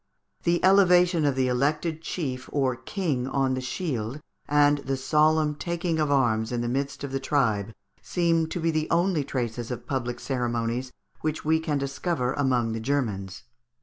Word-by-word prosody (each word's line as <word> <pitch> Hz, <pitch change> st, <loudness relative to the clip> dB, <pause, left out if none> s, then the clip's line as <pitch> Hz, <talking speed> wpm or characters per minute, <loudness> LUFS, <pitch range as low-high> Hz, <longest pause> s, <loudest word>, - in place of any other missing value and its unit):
The 175 Hz, +1 st, +2 dB
elevation 180 Hz, -4 st, +5 dB
of 140 Hz, -2 st, +2 dB
the 130 Hz, -1 st, +1 dB
elected 150 Hz, +6 st, 0 dB
chief 130 Hz, -7 st, -4 dB
or 135 Hz, -3 st, +1 dB
king 130 Hz, -, -2 dB
on 135 Hz, -1 st, +1 dB
the 130 Hz, -, -2 dB
shield 130 Hz, -3 st, -3 dB, 0.3 s
and 145 Hz, 0 st, +4 dB
the 135 Hz, -1 st, -2 dB
solemn 150 Hz, +2 st, +3 dB
taking 170 Hz, +1 st, -2 dB
of 150 Hz, -1 st, +1 dB
arms 115 Hz, -5 st, +2 dB
in 120 Hz, -1 st, -1 dB
the 120 Hz, -, -2 dB
midst 140 Hz, +3 st, -2 dB
of 140 Hz, -, -4 dB
the 135 Hz, -, -1 dB
tribe 115 Hz, -7 st, 0 dB, 0.3 s
seem 165 Hz, -2 st, +1 dB
to 175 Hz, -, -4 dB
be 165 Hz, 0 st, +1 dB
the 155 Hz, -1 st, -1 dB
only 170 Hz, -2 st, +2 dB
traces 120 Hz, -4 st, -3 dB
of 125 Hz, -, -5 dB
public 120 Hz, -3 st, -3 dB
ceremonies 120 Hz, -1 st, -2 dB, 0.3 s
which 155 Hz, 0 st, -3 dB
we 160 Hz, +1 st, +3 dB
can 160 Hz, -3 st, -1 dB
discover 140 Hz, -1 st, -1 dB
among 125 Hz, -5 st, +1 dB
the 115 Hz, -, -3 dB
Grermans. 110 Hz, -8 st, -2 dB
140 Hz, 170 wpm, -26 LUFS, 125-160 Hz, 0.3 s, elevation